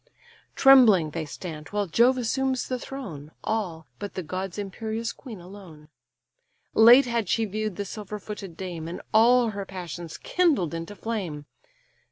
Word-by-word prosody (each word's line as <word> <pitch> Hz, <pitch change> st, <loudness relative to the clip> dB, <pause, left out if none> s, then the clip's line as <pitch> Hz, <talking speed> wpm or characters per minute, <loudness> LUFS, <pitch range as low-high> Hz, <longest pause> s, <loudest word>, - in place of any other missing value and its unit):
Trembling 225 Hz, -, +6 dB
they 160 Hz, 0 st, -3 dB
stand, 155 Hz, 0 st, -8 dB
while 205 Hz, 0 st, -1 dB
Jove 235 Hz, +8 st, +3 dB
assumes 260 Hz, +2 st, -1 dB
the 255 Hz, -1 st, -2 dB
throne, 185 Hz, -, -8 dB
All, 180 Hz, -8 st, -2 dB
but 205 Hz, -1 st, -6 dB
the 185 Hz, -, -3 dB
god's 185 Hz, +3 st, -5 dB
imperious 220 Hz, +3 st, -4 dB
queen 230 Hz, -8 st, -10 dB
alone: 175 Hz, -5 st, -13 dB, 0.8 s
Late 240 Hz, +4 st, +8 dB
had 235 Hz, -5 st, -1 dB
she 225 Hz, -, +2 dB
view'd 215 Hz, -1 st, -3 dB
the 200 Hz, -, -4 dB
silver 210 Hz, +1 st, -6 dB
footed 200 Hz, -4 st, -8 dB
dame, 175 Hz, -4 st, -5 dB
And 170 Hz, -, -6 dB
all 235 Hz, +1 st, +5 dB
her 200 Hz, -1 st, -5 dB
passions 175 Hz, -3 st, -7 dB
kindled 295 Hz, -, +1 dB
into 165 Hz, +5 st, -6 dB
flame. 185 Hz, -11 st, -4 dB
205 Hz, 150 wpm, -26 LUFS, 175-230 Hz, 0.8 s, Late